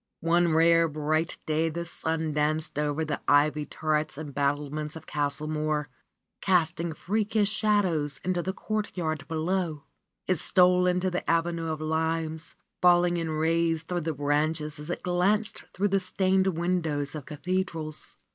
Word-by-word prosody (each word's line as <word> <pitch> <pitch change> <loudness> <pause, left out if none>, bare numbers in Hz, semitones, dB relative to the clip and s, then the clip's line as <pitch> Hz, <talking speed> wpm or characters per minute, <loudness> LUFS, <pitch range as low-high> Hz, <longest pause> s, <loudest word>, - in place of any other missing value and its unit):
One 170 +1 +3
rare, 165 +1 +5
bright 155 +2 -1
day 160 +1 +1
the 170 +2 -4
sun 160 -2 -2
danced 150 0 0
over 150 +1 0
the 150 -1 -3
ivied 150 +1 +3
turrets 155 -2 -1
and 150 -2 -7
battlements 145 +2 -1
of 160 -1 -9
Castle 145 0 -2
Mohr, 155 -1 -1 0.5
casting 170 -2 +1
freakish 210 +3 0
shadows 185 -10 +1
into 180 -1 +1
the 190 - -2
courtyard 180 -8 -3
below. 160 -1 -1 0.4
It 185 -4 +1
stole 180 +1 +4
into 180 +1 +1
the 180 - -3
avenue 165 0 +1
of 155 -1 -4
limes, 160 0 -2 0.3
falling 175 0 +5
in 165 -1 -2
rays 165 +1 +1
through 175 +1 -2
the 160 0 -2
branches 150 +1 0
as 150 +2 -8
it 175 - -4
glanced 195 +5 0
through 205 +2 0
the 195 0 +2
stained 190 0 +1
windows 165 -5 -1
of 150 -4 -7
cathedrals. 160 -1 -3
160 Hz, 145 wpm, -27 LUFS, 150-180 Hz, 0.5 s, rare